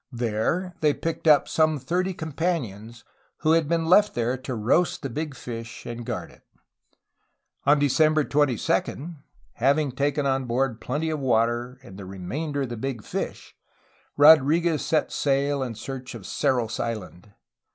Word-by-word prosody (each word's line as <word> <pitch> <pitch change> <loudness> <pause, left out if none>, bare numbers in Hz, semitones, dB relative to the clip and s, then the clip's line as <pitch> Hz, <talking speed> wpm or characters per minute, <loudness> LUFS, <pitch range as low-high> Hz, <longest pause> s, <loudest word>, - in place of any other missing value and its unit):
There 120 - -1
they 150 -2 +3
picked 165 0 -4
up 150 -2 +6
some 155 -1 +2
thirty 180 +7 -1
com 160 -2 -6
panions 120 - -3 0.4
who 155 - +3
had 165 -2 +3
been 165 -1 +1
left 205 +5 +4
there 120 +1 0
to 130 -1 -5
roast 130 +11 +1
the 135 - -4
big 150 +2 -4
fish 115 -2 -8
and 120 0 -6
guard - - -5
it. - - -21 1.3
On 145 +1 +6
December 155 +2 +3
22, 145 +3 0 0.4
having 140 +3 +2
taken 140 +2 0
on 135 -1 0
board 120 -1 -1
plenty 160 +7 -2
of 155 - -2
water 120 0 0
and 100 -6 -12
the 100 - -8
remainder 135 - -4
of 130 - -4
the 120 - -5
big 120 -2 -4
fish, - - -5 0.6
Rodriguez 155 +2 +5
set 155 -2 0
sail 140 0 0
in 125 -3 -3
search 130 +2 -7
of 110 - -9
Cerros 120 -2 -1
Island. 105 -4 -5
135 Hz, 155 wpm, -25 LUFS, 120-155 Hz, 1.3 s, up